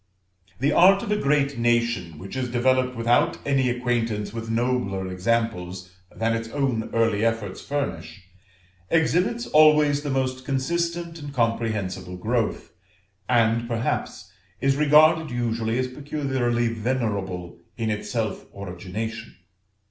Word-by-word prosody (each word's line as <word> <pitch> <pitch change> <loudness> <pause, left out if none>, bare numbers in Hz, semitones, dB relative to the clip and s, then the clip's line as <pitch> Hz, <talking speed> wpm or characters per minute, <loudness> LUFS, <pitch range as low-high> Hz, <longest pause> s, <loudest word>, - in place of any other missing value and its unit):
The 140 +4 +2
art 195 +6 +6
of 210 - -4
a - - +3
great 140 -7 +1
nation, 115 -8 +1
which 95 +9 -8
is 130 -1 -2
developed 125 +1 +1
without 115 +1 +2
any 135 -3 +2
acquaintance 115 -4 -1
with 115 0 -5
nobler 115 -5 0
examples 95 -2 -2 0.2
than 115 0 -1
its 115 0 -4
own 130 -5 -1
early 115 -2 +1
efforts 115 -4 -1
furnish, 140 -8 -4 0.7
exhibits 180 +9 +1
always 150 -1 +5
the 145 - -4
most 130 -1 -1
consistent 170 +5 -2
and 145 -1 -7
comprehensible 110 -7 -2
growth, 115 +3 -1 0.6
and 115 -1 +2
perhaps 115 0 -3 0.3
is 135 0 +2
regarded 155 +2 +5
usually 115 -1 -1
as 130 0 0
peculiarly 130 -4 -1
venerable 105 -7 -3 0.2
in 115 -2 -1
its 105 - -4
self 110 -4 -3
origination. 100 +4 -6
120 Hz, 125 wpm, -24 LUFS, 110-140 Hz, 0.7 s, art